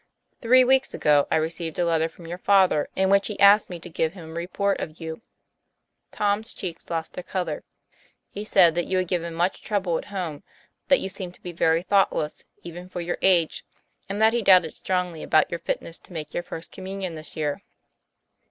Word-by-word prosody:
Three 255 Hz, +2 st, +6 dB
weeks 265 Hz, +1 st, +2 dB
ago, 145 Hz, -1 st, +3 dB
I -, -, +2 dB
received 160 Hz, 0 st, -2 dB
a 175 Hz, -, +1 dB
letter 165 Hz, -1 st, +1 dB
from 170 Hz, +1 st, -15 dB
your 175 Hz, +2 st, -6 dB
father 190 Hz, -6 st, +3 dB
in 190 Hz, 0 st, +2 dB
which 200 Hz, 0 st, +4 dB
he 210 Hz, -, -6 dB
asked 200 Hz, +1 st, +6 dB
me 175 Hz, -2 st, -6 dB
to 175 Hz, -, -9 dB
give 160 Hz, -1 st, -1 dB
him 165 Hz, -4 st, -10 dB
a -, -, -9 dB
report 180 Hz, +4 st, -1 dB
of 155 Hz, 0 st, -6 dB
you." 160 Hz, +3 st, -6 dB, 0.9 s
Tom's 210 Hz, +2 st, -1 dB
cheeks 175 Hz, -5 st, -7 dB
lost 165 Hz, -1 st, -3 dB
their -, -, -5 dB
color. 175 Hz, -5 st, -3 dB, 0.3 s
'* -, -, -36 dB
He 205 Hz, -, -5 dB
said 185 Hz, -6 st, +5 dB
that 175 Hz, +1 st, -1 dB
you 185 Hz, -, 0 dB
had 185 Hz, -1 st, 0 dB
given 170 Hz, -2 st, -2 dB
much 175 Hz, +3 st, 0 dB
trouble 190 Hz, -5 st, -1 dB
at -, -, -9 dB
home, 180 Hz, -7 st, -5 dB, 0.5 s
that 275 Hz, -, +4 dB
you -, -, -2 dB
seemed 180 Hz, -2 st, -7 dB
to -, -, -24 dB
be 180 Hz, -, -5 dB
very 165 Hz, 0 st, +2 dB
thoughtless 190 Hz, -6 st, +1 dB, 0.2 s
even 175 Hz, +1 st, -9 dB
for 180 Hz, -, -6 dB
your 175 Hz, 0 st, -3 dB
age, 175 Hz, -4 st, +2 dB, 0.5 s
and 200 Hz, +1 st, -3 dB
that 220 Hz, +1 st, +5 dB
he 240 Hz, -, +1 dB
doubted 180 Hz, -6 st, +5 dB
strongly 180 Hz, -3 st, -2 dB
about 155 Hz, -, +2 dB
your 170 Hz, -, -3 dB
fitness 165 Hz, 0 st, -4 dB
to -, -, -16 dB
make 155 Hz, -2 st, -6 dB
your -, -, -1 dB
First 165 Hz, -1 st, -9 dB
Communion 190 Hz, -1 st, -5 dB
this 155 Hz, -1 st, -9 dB
year." 150 Hz, -2 st, -2 dB
175 Hz, 205 wpm, -25 LUFS, 165-195 Hz, 0.9 s, Three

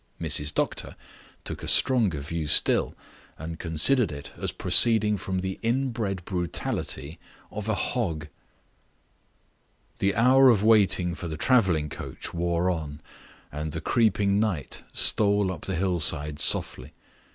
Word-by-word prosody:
Mrs. 75 Hz, +1 st, 0 dB
Doctor -, -, -3 dB, 0.5 s
took -, -, -7 dB
a -, -, -7 dB
stronger 110 Hz, -, +2 dB
view 80 Hz, +1 st, -5 dB
still, 75 Hz, -, +3 dB, 0.4 s
and 80 Hz, +1 st, -8 dB
considered 85 Hz, -, +2 dB
it 70 Hz, 0 st, -9 dB
as -, -, -4 dB
proceeding 110 Hz, -3 st, +4 dB
from 95 Hz, -1 st, -4 dB
the 95 Hz, 0 st, -5 dB
inbred 115 Hz, -6 st, -2 dB
brutality 85 Hz, -5 st, -4 dB, 0.3 s
of 105 Hz, +1 st, -6 dB
a 110 Hz, -, +1 dB
hog. 85 Hz, -, -3 dB, 1.7 s
The 100 Hz, 0 st, 0 dB
hour 130 Hz, +4 st, +5 dB
of 105 Hz, -4 st, +3 dB
waiting 95 Hz, -5 st, +3 dB
for 85 Hz, 0 st, -7 dB
the 80 Hz, -1 st, -6 dB
traveling 95 Hz, -, +2 dB
carriage -, -, -8 dB
wore 85 Hz, +1 st, 0 dB
on, 75 Hz, -4 st, -6 dB, 0.5 s
and 75 Hz, +1 st, -5 dB
the 80 Hz, -, -3 dB
creeping 100 Hz, -2 st, +1 dB
night 95 Hz, -, -2 dB
stole 100 Hz, -2 st, +2 dB
up 80 Hz, -, -8 dB
the 95 Hz, -, -3 dB
hillsides 80 Hz, -4 st, 0 dB
softly. -, -, 0 dB
95 Hz, 130 wpm, -25 LUFS, 80-110 Hz, 1.7 s, hour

